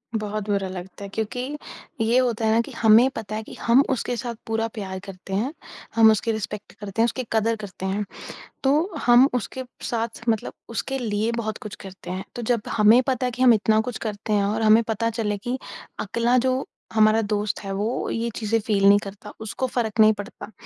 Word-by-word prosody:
बहुत 215 -1 -2
बुरा 195 -1 +1
लगता 185 +1 -8
है 200 - -6
क्योंकि 220 +2 -3 0.6
ये 225 +2 +3
होता 240 -3 +1
है 220 - +3
ना 225 - +4
कि - - -10
हमें 225 +3 +5
पता 215 -1 -5
है 220 - -3
कि - - -11
हम 240 +3 +5
उसके 250 -1 -1
साथ 235 +1 -4
पूरा 225 0 0
प्यार 190 -3 -5
करते 190 0 -9
हैं, 230 +9 0 0.4
हम 225 -1 +7
उसकी 220 +2 0
रिस्पेक्ट 210 -1 -5
करते 205 +1 -3
हैं, - - +6
उसकी 255 +2 -2
कदर 225 +1 +2
करते 195 -3 -8
हैं, 200 +2 -1 0.6
तो 300 +8 +2
हम 245 +2 +7
उसके 250 +2 -3 0.2
साथ 230 -1 -3
मतलब 220 -2 0 0.2
उसके 270 +4 -3
लिए 220 -1 0
बहुत 220 -2 -3
कुछ 210 -1 -7
करते 190 -2 -9
हैं। 185 +1 -4
तो 240 - -4
जब 235 -1 +1 0.2
हमें 215 +3 +7
पता 260 -1 0
है 250 - 0
कि 245 +2 -6
हम 245 -2 +8
इतना 215 0 +3
कुछ 235 +1 -4
करते 210 +1 -3
हैं 205 -1 +3
और 215 +2 -1
हमें 220 +1 +6
पता 225 +1 -1
चले 215 -2 -2
कि 245 +5 -3 0.4
अगला 235 +4 +1
जो 260 +1 +1 0.3
हमारा 215 0 +5
दोस्त 210 -1 -1
है 195 - -5
वो 215 +6 -2
ये 230 +1 -1
चीज़ें 225 0 0
फ़ील 205 -2 +1
नहीं 205 0 +7
करता, 205 +1 -9
उसको 220 +4 -3
फ़र्क 230 -3 -2
नहीं 215 0 +7
पड़ता, 205 +2 -9
220 Hz, 210 wpm, -24 LUFS, 205-235 Hz, 0.6 s, हम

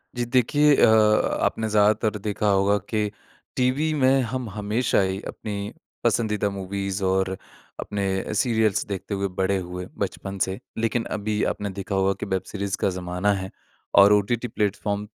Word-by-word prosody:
जी। 120 0 -1
देखिए 135 +4 +3
अ, - - +6
आपने 110 0 +3
ज़्यादातर 105 0 +2
देखा 105 +1 -2
होगा 100 +1 +3
कि 105 -2 0 0.5
टीवी 135 +5 +1
में 130 +1 +4
हम 130 -3 -3
हमेशा 105 +3 0
ही 95 0 -1
अपनी 100 -1 -5 0.3
पसंदीदा 105 -3 +1
मूवीज़ 100 0 -4
और 95 0 +1 0.4
अपने 100 -1 -2
सीरियल्स 110 -2 +1
देखते 100 +1 -5
हुए 100 0 -1
बड़े 95 +1 +2
हुए 90 0 -5
बचपन 95 0 -4
से 95 +1 -5 0.2
लेकिन 115 +1 0
अभी 105 0 -1
आपने 105 - -4
देखा 100 0 -3
होगा 95 0 +2
कि - - -3
वेब 95 -2 -1
सीरीज़ 100 -1 -3
का - - +1
ज़माना 90 +3 0
है 95 -1 -4 0.5
और 100 +1 +8
ओटीटी 110 +4 +1
प्लेटफ़ॉर्म 105 -1 -2
105 Hz, 155 wpm, -24 LUFS, 95-110 Hz, 0.5 s, और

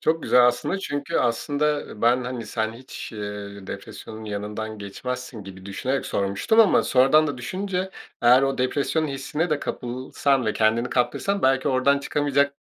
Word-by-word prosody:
Çok 160 0 +1
güzel 125 -1 +5
aslında 125 +10 0
çünkü 145 -6 -3
aslında 145 +5 +1 0.2
ben, 120 +2 +3
hani, 125 -3 -5
sen 110 +1 -2
hiç, 125 0 -9
eee, 105 -2 -7
depresyonun 110 +2 -8
yanından 105 +1 -5
geçmezsin 120 +2 -6
gibi 95 0 -10
düşünerek 130 +7 -2
sormuştum 100 - +2
ama 215 - +5
sonradan 135 +4 +4
da 145 -3 -4
düşününce, 185 +7 -3 0.3
eğer 125 +3 +7
o 135 0 0
depresyonun 145 +5 0
hissine 145 +5 -2
de 150 - +2
kapılsan 130 0 -1
ve 110 - +2
kendini 115 +3 +1
kaptırsan 195 +11 0
belki 135 0 +3
oradan 135 +2 +3
çıkamayacak 140 0 +1
125 Hz, 150 wpm, -24 LUFS, 110-145 Hz, 0.3 s, eğer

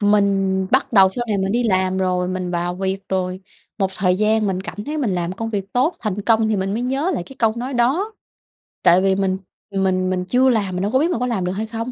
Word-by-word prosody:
Mình 195 -2 +2
bắt 260 - +2
đầu 195 -3 +6
sau 240 +5 -3
này 205 - 0
mình 190 +1 0
đi 240 +2 +1
làm 190 -3 +1
rồi, 180 -1 0
mình 185 -1 -3
vào 175 0 -1
việc 190 +1 -2
rồi, 185 0 -2 0.4
một 190 -1 +1
thời 180 -1 +2
gian 215 +1 +2
mình 190 -2 -1
cảm 205 +2 -7
thấy 305 +1 -3
mình 230 -10 0
làm 175 0 -2
công 225 +4 -4
việc 200 -2 -4
tốt, 265 +8 +2
thành 205 -2 -3
công 220 0 +3
thì 215 - +1
mình 195 +1 -1
mới 235 - -2
nhớ 270 +7 0
lại - - -2
cái 270 - -13
câu 225 -2 +3
nói 255 +3 -4
đó. 280 - +1 0.7
Tại 175 +2 +6
vì 190 0 +2
mình 190 -1 0 0.4
mình 185 -1 +1
mình 180 -1 -1
chưa 250 +7 +3
làm 205 -6 0
mình 180 - -2
đâu 205 - -1
có 260 - +3
biết 330 +5 +1
mình 235 - -1
có 250 - 0
làm 210 -7 -1
được 180 - -1
hay 210 +4 -3
không. 230 +2 -4
195 Hz, 260 wpm, -20 LUFS, 185-230 Hz, 0.7 s, đầu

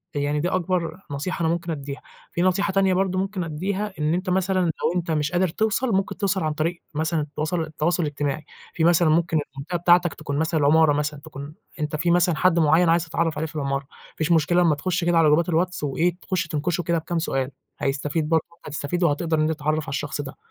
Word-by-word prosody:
يعني 145 +1 0
دي 175 +4 0
أكبر 185 -1 -1
نصيحة 165 +6 -3
أنا 160 - +2
ممكن 170 0 -3
أدّيها، 140 -2 -5 0.3
في 170 - -2
نصيحة 185 +1 +1
تانية 195 -1 +3
برضه 185 0 +1
ممكن 195 -1 -2
أدّيها، 190 +6 -3
إن 150 +1 +1
أنت 185 +1 -2
مثلًا 185 +1 +1
لو 165 -1 0
أنت 170 -2 -1
مش 150 -1 0
قادر 180 +1 +3
توصل، 220 +7 0
ممكن 195 0 -1
توصل 195 -3 0
عن 155 -1 0
طريق 165 +3 -2
مثلًا 155 +1 0
التواصل 155 +4 -2
ال 160 - -3
التواصل 160 +3 0
الاجتماعي. 145 0 -2 0.3
في 160 - -1
مثلًا 170 -1 +4
ممكن 165 +1 +2 0.2
المنطقة 150 +6 -3
بتاعتك 175 -1 +4
تكون 145 -2 -4
مثلًا 160 0 +1
العمارة 150 +1 +5
مثلًا، 150 0 -2
تكون 150 -1 -9 0.2
أنت 150 0 -2
في 170 +2 +1
مثلًا 175 -1 +3
حد 180 -2 +3
معيّن 160 +3 +4
عايز 170 +1 +3
تتعرف 165 -1 -1
عليه 160 +1 -1
في 155 - -13
العمارة، 140 -2 -1
ما 135 - -21
فيش 160 +2 0
مشكلة 170 +2 +4
أمّا 165 -4 +4
تخش 180 +4 -1
كده 175 -1 +3
على 165 -1 +5
جروبات 165 +3 +3
الWhats 175 +1 0
وإيه 160 +5 +1
تخش 185 -2 -2
تنكشه 170 +3 -1
كده 170 0 +1
بكام 165 +1 -2
سؤال، 135 -4 -1 0.3
هيستفيد 150 +3 -1
برضه، 160 -1 +3
وأنت 170 - -23
هتستفيد 150 +4 -2
وهتقدر 160 0 +1
إن 155 - +3
تتعرف 155 0 -1
على - - -8
الشخص 145 +1 -3
ده 135 0 -8
165 Hz, 220 wpm, -24 LUFS, 150-175 Hz, 0.3 s, العمارة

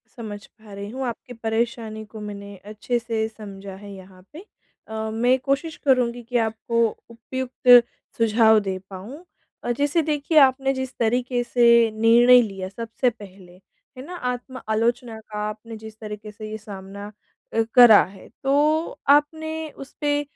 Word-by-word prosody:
समझ 210 -3 -8
पा 215 -2 -17
रही 200 +1 -7
हूँ, 260 +4 -4
आपकी 245 +2 -7
परेशानी 225 -1 -2
को 215 +1 -11
मैंने 200 0 -9 0.2
अच्छे 240 +3 -2
से 225 -1 -2
समझा 200 -3 -10
है 205 - -9
यहाँ 190 -1 -14
पे। 310 - -9 0.5
अ, 220 0 -4
मैं 245 +4 +2
कोशिश 275 +5 -2
करुँगी 245 -3 +2
कि 240 +1 -2
आपको 230 +1 0 0.2
उपयुक्त 245 +1 +4 0.3
सुझाव 220 -1 +4
दे 190 -1 -1
पाऊँ। 220 - -10 0.4
अ, 240 - -1
जैसे 290 +4 +2
देखिए, 305 0 -1
आपने 270 0 +4
जिस 260 0 -5
तरीके 245 +2 0
से 240 0 +3 0.3
निर्णय 235 +3 +6
लिया 195 -4 -5
सबसे 230 +4 -1
पहले, 195 -5 -14 0.4
है 255 - -8
ना? 360 +3 -8
आत्म 250 -3 -5
आलोचना 230 +1 -1
का 215 -1 -8
आपने 220 +2 -9
जिस 220 0 -11
तरीके 210 -1 -8
से 215 +1 -9
ये 215 - -4
सामना 200 -1 -9 0.4
अ, 225 - +2
करा 240 -4 +9
है, 190 +1 -12 0.2
तो 300 +4 +1
आपने 315 +2 +2
उसपे 290 +2 -3
230 Hz, 155 wpm, -23 LUFS, 215-260 Hz, 0.5 s, करा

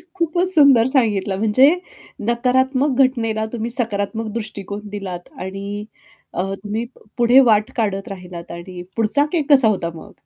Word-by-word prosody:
खूपच 345 +1 0
सुंदर 280 -7 +6
सांगितलं, 205 -7 +1
म्हणजे 220 +6 +4 0.6
नकारात्मक 260 +3 +1
घटनेला 225 -4 -1
तुम्ही 230 0 -3
सकारात्मक 225 -2 -2
दृष्टिकोन 205 -3 -6
दिलात 190 -4 -7
आणि 200 +2 -6 0.5
अ, 180 - -1
तुम्ही 210 +4 -4
प - - -20 0.2
पुढे 240 +2 +5
वाट 215 -5 +3
काढत 200 -4 -2
राहिलात. 180 -3 -9
आणि 175 +1 -8
पुढचा 230 +6 +2
केक 315 -4 -1
कसा 265 -5 +8
होता 185 -5 0
मग? 165 - -12
220 Hz, 140 wpm, -20 LUFS, 195-255 Hz, 0.6 s, कसा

